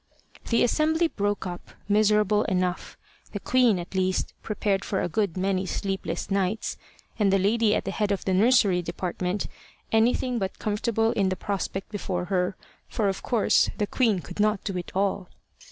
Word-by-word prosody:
The 230 - +3
assembly 315 +6 +2
broke 205 -4 -2
up, 175 -1 -7 0.2
miserable 210 0 +3
enough 180 -1 -1 0.4
the 205 - -3
queen, 245 -2 +3
at 175 +2 -7
least, 185 0 0
prepared 205 -2 -1
for 190 - -1
a - - 0
good 195 -1 -1
many 190 0 0
sleepless 195 +1 -3
nights, 195 +2 0 0.4
and 200 -2 +3
the 195 - +4
lady 210 +3 +2
at - - -2
the - - -2
head 210 -2 -1
of 200 - -2
the 190 - +1
nursery 200 -3 +4
department 180 +2 -3 0.5
anything 240 +2 +2
but 190 -1 -3
comfortable 225 +1 0
in 200 -5 +1
the 185 - -1
prospect 195 +1 -4
before 185 -4 -3
her, 180 +1 +1 0.3
for 210 -3 0
of 195 - -3
course 235 -4 +3
the 210 - +1
queen 215 -4 +1
could 145 - -10
not 210 -1 +2
do 195 - -3
it 180 -1 -5
all. 195 -1 0
200 Hz, 170 wpm, -26 LUFS, 185-215 Hz, 0.5 s, the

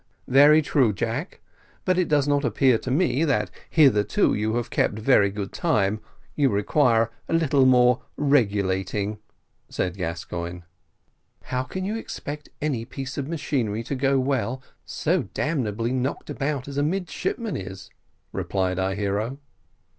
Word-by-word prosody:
"Very 145 +4 +6
true, 130 -7 +2
Jack; 120 - -4 0.4
but 185 - +3
it 180 -2 +1
does 145 -2 +2
not 145 0 +2
appear 130 -6 +3
to - - -6
me, 140 0 +2
that, 145 -5 +1 0.2
hitherto, 120 -10 +4
you 110 +2 -1
have 120 -1 -2
kept 105 - +1
very 110 -3 +4
good 100 0 -5
time: 110 - +1 0.4
you 140 -3 +3
require 115 +2 +2 0.2
a - - +1
little 140 -5 +3
more 125 -1 +5 0.2
regulating," 105 -6 +1 0.5
said 90 0 -2
Gascoigne. 85 0 -4 0.8
"How 125 0 -2
can 185 +9 -5
you 215 +3 -2
expect 150 -9 -7
any 135 -7 -1
piece 135 +3 -6
of 135 - -3
machinery 125 -9 -2
to 130 - -4
go 135 0 +2
well, 130 -1 -1 0.2
so 155 - -1
damnably 120 -7 -1
knocked 130 +2 -2
about 140 -2 -2
as 140 0 -6
a - - +2
midshipman 190 - -2
is?" 95 0 -7 0.4
replied 95 -1 -1
our 95 0 0
hero. 105 +5 -2
130 Hz, 145 wpm, -24 LUFS, 105-145 Hz, 0.8 s, Very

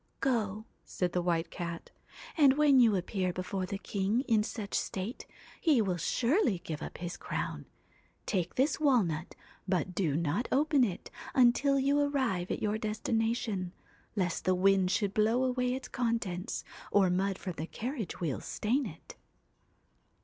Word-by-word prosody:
' - - -43
Go,' 220 -5 0 0.2
said 180 -1 -2
the 180 - +1
White 170 -1 0
Cat, 170 -2 -6 0.2
' - - -15
and 285 -4 +6
when 290 -3 +6
you 230 -4 +5
appear 185 0 -1
before 185 +1 -3
the 200 - -3
king 200 +3 0
in 225 -6 +2
such 210 -1 -5
state, 200 +7 -3 0.3
he 305 -7 +4
will 190 -5 +1
surely 235 - +2
give 155 -1 -5
up - - -6
his 175 +1 -5
crown. - - -4 0.6
Take 185 -5 -1
this 275 +5 +2
walnut, 200 - +1 0.3
but 185 -1 0
do 170 -6 0
not 170 +8 0
open 290 -1 +3
it 195 -7 -3 0.2
until 260 +3 +4
you 280 +2 +2
arrive 260 -11 0
at - - -3
your 215 +1 0
destination, 220 -3 -1 0.4
lest 180 -5 -1
the 185 - +3
wind 190 0 +3
should 200 0 0
blow 225 +4 +3
away 250 -1 0
its 265 - -6
contents, 230 -7 -2 0.3
or 195 -3 +4
mud 190 +1 0
from 185 - -5
the 160 - -4
carriage 235 - -5
wheels 160 -6 -3
stain 250 +4 0
it.' 165 -3 -11
210 Hz, 160 wpm, -31 LUFS, 180-250 Hz, 0.6 s, and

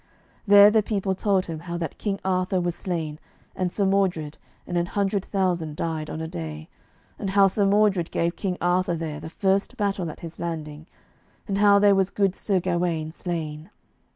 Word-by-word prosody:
There 205 +1 +8
the 220 0 +4
people 200 -2 -1
told 195 -1 +1
him 165 -2 -5
how 170 +1 -5
that 165 -3 -5
King 200 -2 -2
Arthur 185 0 +1
was 175 -1 -1
slain, 160 -4 -4 0.4
and 185 -1 -1
Sir 200 - 0
Mordred, 185 -6 0 0.3
and 175 - -5
an 175 0 +1
hundred 200 0 0
thousand 175 -7 -1
died 160 -1 -3
on 155 - -5
a 160 - -4
day, 80 - -7 0.5
and 195 - -3
how 195 0 +5
Sir 195 +1 +2
Mordred 200 -4 +3
gave 170 +1 -1
King 185 -3 -3
Arthur 175 0 +1
there 155 -2 -4
the 160 - -8
first 195 +7 0
battle 195 -5 -1
at 155 - -10
his 165 -1 -9
landing, 155 -2 -5 0.6
and 200 -1 -1
how 205 -1 +6
there 200 0 +5
was 195 -1 +2
good 195 -2 +1
Sir 195 -3 0
Gawaine 170 -3 -1
slain. 160 -1 -5
180 Hz, 185 wpm, -25 LUFS, 165-195 Hz, 0.6 s, There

